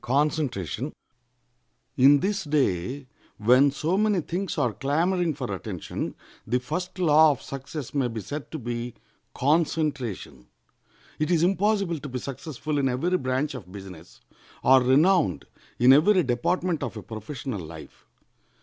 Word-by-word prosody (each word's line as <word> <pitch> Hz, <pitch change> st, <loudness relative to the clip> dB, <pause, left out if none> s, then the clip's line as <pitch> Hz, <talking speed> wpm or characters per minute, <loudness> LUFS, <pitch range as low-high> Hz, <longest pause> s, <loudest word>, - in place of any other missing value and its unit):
] -, -, -13 dB, 1.9 s
In 140 Hz, +2 st, +6 dB
this 195 Hz, +1 st, -1 dB
day, 135 Hz, -, 0 dB, 0.3 s
when 125 Hz, +6 st, +5 dB
so 160 Hz, +6 st, -1 dB
many 210 Hz, -4 st, +2 dB
things 180 Hz, +4 st, -4 dB
are 120 Hz, -3 st, +1 dB
clamoring 165 Hz, -, 0 dB
for 130 Hz, -3 st, -4 dB
attention, 95 Hz, -7 st, -5 dB, 0.3 s
the 125 Hz, +3 st, +1 dB
first 155 Hz, +9 st, -5 dB
law 160 Hz, -3 st, +6 dB
of 140 Hz, -, -1 dB
success 140 Hz, 0 st, -7 dB
may 135 Hz, -3 st, +1 dB
be 115 Hz, -2 st, -5 dB
said 140 Hz, +9 st, -6 dB
to 160 Hz, -, -5 dB
be 120 Hz, -2 st, -5 dB, 0.4 s
concentration. 140 Hz, -, -1 dB, 0.7 s
It 155 Hz, -, 0 dB
is 170 Hz, -2 st, +3 dB
impossible 195 Hz, -2 st, +1 dB
to 140 Hz, -, -7 dB
be 130 Hz, -, -4 dB
successful 145 Hz, +3 st, -4 dB
in 135 Hz, -1 st, +2 dB
every 165 Hz, +9 st, 0 dB
branch 130 Hz, +3 st, -1 dB
of 100 Hz, -9 st, -9 dB
business, 95 Hz, -4 st, -11 dB, 0.4 s
or 130 Hz, 0 st, +6 dB
renowned 145 Hz, -, +3 dB, 0.3 s
in 125 Hz, +2 st, +7 dB
every 180 Hz, +6 st, +5 dB
department 160 Hz, +7 st, 0 dB
of -, -, -4 dB
a 105 Hz, -, -7 dB
professional 110 Hz, +2 st, -6 dB
life. 80 Hz, -1 st, -12 dB
140 Hz, 140 wpm, -26 LUFS, 120-165 Hz, 1.9 s, in